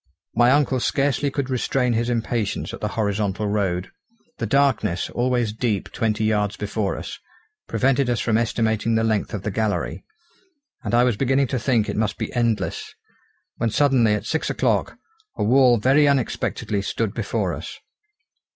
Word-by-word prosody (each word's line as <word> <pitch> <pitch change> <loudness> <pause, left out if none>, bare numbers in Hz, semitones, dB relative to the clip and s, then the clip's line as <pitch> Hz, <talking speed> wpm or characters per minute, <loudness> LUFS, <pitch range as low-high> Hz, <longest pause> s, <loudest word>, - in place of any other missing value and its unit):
My 120 +2 +4
uncle 135 -1 +3
scarcely 140 +2 +1
could 135 -1 -3
restrain 125 0 +1
his 115 +1 0
impatience 115 -3 -2
at - - -8
the - - 0
horizontal 105 -1 -1
road. 95 -3 -1 0.5
The - - -2
darkness, 130 -10 +1
always 120 -3 0
deep 110 -3 -2
twenty 110 -2 -1
yards 105 -2 0
before 105 -1 -2
us, - - -7 0.5
prevented 135 0 +1
us 120 - +1
from 110 - +1
estimating 115 -1 +1
the 110 - +2
length 110 -2 0
of 105 -3 -5
the 105 - -2
gallery; 110 +1 -2 0.8
and - - 0
I 120 - +5
was 125 -4 +1
beginning 135 +2 +2
to 130 - -1
think 115 -3 +1
it - - -3
must 110 0 -1
be - - -4
endless, 115 -3 -1 0.6
when 115 - 0
suddenly 120 -4 +3
at 105 - -5
six 160 - -1
o'clock - - 0 0.4
a - - 0
wall 125 +2 +5
very 135 +6 +4
unexpectedly 125 -6 0
stood 105 +1 -2
before - - -2
us. - - -7
115 Hz, 160 wpm, -23 LUFS, 105-130 Hz, 0.8 s, I